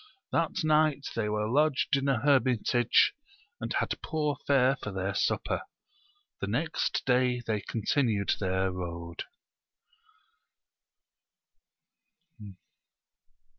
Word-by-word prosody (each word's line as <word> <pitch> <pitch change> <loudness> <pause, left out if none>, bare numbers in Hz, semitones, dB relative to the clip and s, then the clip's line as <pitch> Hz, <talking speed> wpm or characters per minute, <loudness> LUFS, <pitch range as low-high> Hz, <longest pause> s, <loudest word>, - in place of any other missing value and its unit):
That 165 -1 0
night 155 -2 +2
they 105 -2 -1
were 105 0 -1
lodged 140 +2 +2
in 135 0 -1
a 135 - +2
hermitage, 125 -3 +3 0.5
and - - -5
had - - -1
poor 150 -2 -1
fare 135 -1 +4
for 105 - -5
their 95 +1 -2
supper; - - 0 0.8
the - - -3
next - - -1
day 125 -1 +2
they 110 -2 -1
continued 110 -1 0
their 95 -1 0
road. 85 -2 -6
125 Hz, 95 wpm, -29 LUFS, 100-140 Hz, 0.8 s, fare